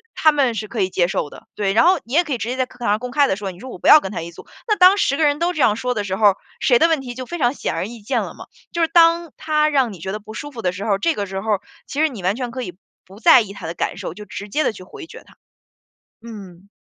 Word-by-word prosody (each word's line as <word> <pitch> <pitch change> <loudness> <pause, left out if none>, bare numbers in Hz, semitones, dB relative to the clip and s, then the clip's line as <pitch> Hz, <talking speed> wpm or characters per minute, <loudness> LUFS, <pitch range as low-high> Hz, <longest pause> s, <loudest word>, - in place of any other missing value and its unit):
他 310 - +5
们 270 -5 +1
是 215 -1 -5
可 230 - -5
以 190 -2 +1
接 175 -1 +1
受 150 - -2
的， - - -13
对， 195 -2 0
然 225 - +5
后 360 -1 +4
你 235 - -10
也 340 +4 +4
可 305 - -8
以 250 - 0
直 225 - -4
接 250 - -2
在 260 0 0
课 - - -20
堂 240 - -3
上 205 +1 +3
公 250 0 -6
开 285 0 +3
地 190 - 0
说， 200 -2 -5
你 180 - -15
说： 260 - -10
“我 - - -8
不 - - -2
要 305 - +10
跟 190 -7 -6
他 170 - -4
一 170 +1 -7
组。” - - -14 0.2
那 425 -3 +1
当 365 +1 +7
10 275 - +1
个 320 - +1
人 290 0 +1
都 345 +1 +1
这 320 - -6
样 210 - +4
说 250 +2 -2
的 210 -3 -3
时 190 -1 -2
候 210 +1 +4
儿， 195 - +4 0.3
谁 245 -3 +4
的 330 - +5
问 320 -4 +1
题 250 -2 -7
就 255 0 -6
非 345 +6 -6
常 245 -4 +1
显 - - -3
而 - - -2
易 235 +1 -9
见 205 - -1
了 - - -6
嘛。 - - -11 0.3
就 340 - -2
是 325 - +3
当 335 -1 +4
他 305 -1 +1
让 270 -6 +1
你 185 - -11
觉 190 +4 -5
得 215 - -4
不 215 +1 -11
舒 290 +4 -7
服 235 -4 -8
的 180 - 0
时 195 +4 -6
候 215 - 0
儿， 195 - +1
这 330 +7 +1
个 205 - -2
时 190 0 -5
候 215 +1 +1
儿， 195 - -8 0.2
其 285 - -6
实 315 - +4
你 225 -10 -8
完 195 +5 0
全 250 -2 -3
可 255 +1 -5
以 180 -6 -7 0.3
不 195 +4 -15
在 260 -3 +7
意 205 -3 -6
他 195 -4 -8
的 165 - -4
感 - - -3
受， - - -6
就 210 +4 -10
直 205 0 -8
接 300 +9 0
地 - - +1
去 185 - -12
回 320 - -11
绝 - - -12
他， - - -21 0.9
嗯。 195 -4 -11
235 Hz, 365 characters per minute, -20 LUFS, 195-295 Hz, 0.9 s, 要